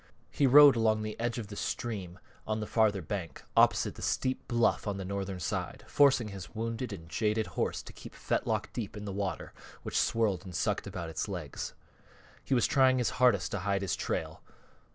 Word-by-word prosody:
He 140 - +2
rode 145 +1 +9
along 110 -1 +2
the 110 0 -4
edge 120 +1 -1
of 110 -4 -5
the 100 - -7
stream 100 -6 -4 0.3
on 110 0 -1
the 105 - -3
farther 105 -4 +2
bank, 95 -3 -5
opposite - - +4
the - - -12
steep 130 0 -1
bluff 120 -2 +1
on 100 -1 -1
the 95 - -5
northern 95 -1 -4
side, 80 - -3
forcing 135 -6 +4
his 100 +1 -9
wounded 115 +2 -3
and 80 -5 -8
jaded 105 +4 0
horse - - -1
to - - -11
keep - - -11
fetlock - - -1
deep 110 -3 -5
in 105 - -7
the 100 - -4
water 100 -1 -3 0.3
which - - -6
swirled 105 -6 +1
and 90 -3 -9
sucked - - -1
about 85 -1 -5
its 80 - -3
legs. 90 -8 -5 0.7
He 135 - +1
was 120 - +3
trying 130 -2 +4
his 125 - +1
hardest 100 -11 +4
to 105 - -2
hide 100 +1 -1
his 95 - 0
trail. - - -3
105 Hz, 195 wpm, -30 LUFS, 95-120 Hz, 0.7 s, rode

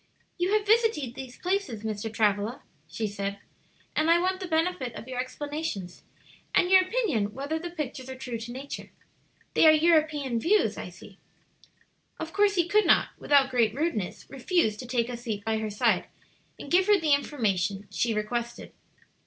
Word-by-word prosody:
"You 360 +2 +1
have 425 -1 +2
visited 435 - +2
these 260 -1 -9
places, 360 - -2
Mr. 220 0 -3
Travilla," 210 +2 0 0.2
she 220 +8 -4
said, 200 -1 -3 0.6
"and 310 +1 +2
I 340 +1 +6
want 370 +1 0
the 375 - -5
benefit 320 -7 -1
of 230 - -8
your 255 -1 -5
explanations, 260 - -4 0.5
and 360 - +3
your 380 0 +8
opinion 355 - -1
whether 285 +4 -3
the 345 +1 -5
pictures 275 -6 -6
are 260 - -6
true 250 -3 -5
to 235 +2 -7
nature. 270 +3 -7 0.6
They - - +6
are - - +10
European 305 -6 +2
views, 405 - +2
I - - -6
see." - - -15 1.0
Of 325 +1 -6
course 405 0 +3
he 345 -2 +2
could 425 +4 +3
not, - - +4
without 275 -2 +3
great 230 -3 +2
rudeness, 280 - -2
refuse 270 - 0
to 250 - -8
take 240 -1 0
a 245 - -4
seat 225 -4 -5
by 220 0 0
her 220 -1 -3
side 205 - +1 0.5
and 280 - -10
give 370 +2 +4
her 415 -1 +5
the 310 -3 +3
information 205 -9 0
she 235 - 0
requested. 235 +3 -3
265 Hz, 175 wpm, -27 LUFS, 225-340 Hz, 1.0 s, are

